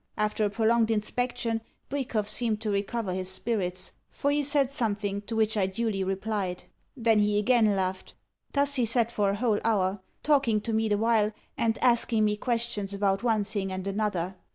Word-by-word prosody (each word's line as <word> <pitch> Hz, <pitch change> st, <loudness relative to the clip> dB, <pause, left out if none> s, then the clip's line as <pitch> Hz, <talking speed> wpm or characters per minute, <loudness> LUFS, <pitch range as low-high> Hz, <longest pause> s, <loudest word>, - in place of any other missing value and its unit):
After 210 Hz, 0 st, 0 dB
a -, -, +1 dB
prolonged 225 Hz, +2 st, +2 dB
inspection, 225 Hz, +1 st, -1 dB, 0.3 s
Bwikov 245 Hz, -7 st, -2 dB
seemed 220 Hz, -1 st, +1 dB
to 215 Hz, -, -1 dB
recover 200 Hz, 0 st, -2 dB
his 185 Hz, 0 st, 0 dB
spirits, 185 Hz, -2 st, 0 dB, 0.2 s
for 285 Hz, -, -1 dB
he 290 Hz, +1 st, +2 dB
said 280 Hz, -2 st, +1 dB
something 205 Hz, -5 st, -1 dB
to 230 Hz, -, -3 dB
which 220 Hz, 0 st, +2 dB
I 195 Hz, -3 st, +2 dB
duly 195 Hz, 0 st, -2 dB
replied. 195 Hz, -1 st, -2 dB, 0.3 s
Then 225 Hz, -3 st, +3 dB
again 210 Hz, +3 st, +3 dB
he -, -, +3 dB
laughed. 190 Hz, -1 st, -2 dB, 0.4 s
Thus 280 Hz, 0 st, +2 dB
he 245 Hz, -, +3 dB
sat 230 Hz, 0 st, +1 dB
for 205 Hz, -4 st, +1 dB
a 200 Hz, -, 0 dB
whole 220 Hz, -1 st, +1 dB
hour 195 Hz, -3 st, +1 dB, 0.2 s
talking 275 Hz, -7 st, +3 dB
to 225 Hz, +1 st, -3 dB
me 220 Hz, 0 st, +1 dB
the 205 Hz, -, +2 dB
while, 220 Hz, -1 st, +2 dB, 0.2 s
and 230 Hz, -1 st, 0 dB
asking 235 Hz, -3 st, +3 dB
me 210 Hz, 0 st, +1 dB
questions 230 Hz, -3 st, -1 dB
about 195 Hz, -1 st, +1 dB
one 225 Hz, -3 st, +1 dB
thing 200 Hz, -2 st, -3 dB
and 185 Hz, 0 st, -4 dB
another. 195 Hz, -3 st, -2 dB
215 Hz, 180 wpm, -27 LUFS, 200-235 Hz, 0.4 s, Then